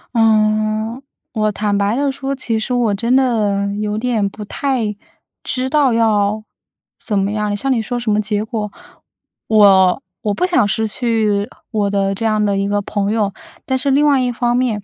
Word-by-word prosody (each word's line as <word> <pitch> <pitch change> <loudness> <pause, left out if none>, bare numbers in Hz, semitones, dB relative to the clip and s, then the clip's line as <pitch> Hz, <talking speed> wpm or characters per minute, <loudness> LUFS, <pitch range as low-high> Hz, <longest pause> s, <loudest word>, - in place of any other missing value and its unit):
嗯。 215 +1 +2 0.3
我 215 -2 +1
坦 205 0 -1
白 200 +2 +1
地 280 +1 +1
说， 275 0 -4
其 230 -4 -2
实 235 +3 -3
我 240 -4 +1
真 235 +5 +1
的 210 -6 +1
有 210 0 -2
点 225 -3 0
不 210 +2 -8
太 225 -1 -2 0.5
知 255 0 -2
道 285 -3 +3
要 215 -2 +1 0.6
怎 210 -4 -2
么 195 +1 0
样。 210 -1 -1
像 270 +7 -2
你 240 -3 +2
说 245 +3 -3
什 240 -2 -1
么 210 - +2
结 210 0 -1
果， 215 -1 -4 0.8
我 195 -1 +5 0.2
我 210 -2 0
不 285 - 0
想 345 - +2
失 220 +2 0
去 215 -3 0 0.2
我 210 -3 0
的 195 -1 0
这 210 +4 -4
样 215 -1 +2
的 200 -1 +1
一 195 0 0
个 205 0 0
朋 205 0 -2
友。 210 -3 0 0.3
但 260 - 0
是 260 +2 -1
另 280 +2 +3
外 285 -2 +4
一 250 - 0
方 240 0 0
面， 230 -5 -1
215 Hz, 200 characters per minute, -18 LUFS, 205-245 Hz, 0.8 s, 我